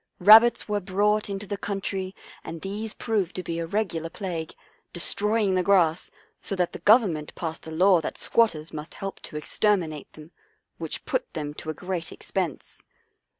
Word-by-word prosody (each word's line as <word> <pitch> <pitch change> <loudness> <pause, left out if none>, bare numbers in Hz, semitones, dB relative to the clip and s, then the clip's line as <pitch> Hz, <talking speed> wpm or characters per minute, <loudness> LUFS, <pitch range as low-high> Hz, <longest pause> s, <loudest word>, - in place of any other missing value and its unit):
Rabbits 225 +5 +7
were 210 -1 0
brought 205 +3 +1
into 200 +1 -4
the 205 0 -5
coun 200 -1 -3
try, 190 -1 -4 0.3
and 165 0 -7
these 210 +3 -4
proved 205 -6 -1
to 185 - -3
be 170 -1 -3
a 165 - -3
regular 170 -4 -2
plague, 170 -4 -5 0.4
destroying 210 +3 +2
the 185 - +2
grass, 180 -3 +3 0.3
so 195 - -3
that 180 -2 0
the - - -8
Government 195 -10 +3
passed 160 -1 -5
a - - -6
law 180 +2 +4
that - - -5
squatters 165 -9 +1
must 150 0 -7
help 195 0 -6
to 150 - -8
exter 210 +7 +2
minate 155 -6 -6
them, 155 +2 -13 0.5
which 160 -2 -5
put - - -2
them 150 -2 -4
to 155 - -8
a 155 - -3
great 180 -2 -4
expense. 180 -7 -4
185 Hz, 180 wpm, -26 LUFS, 165-205 Hz, 0.5 s, Rabbits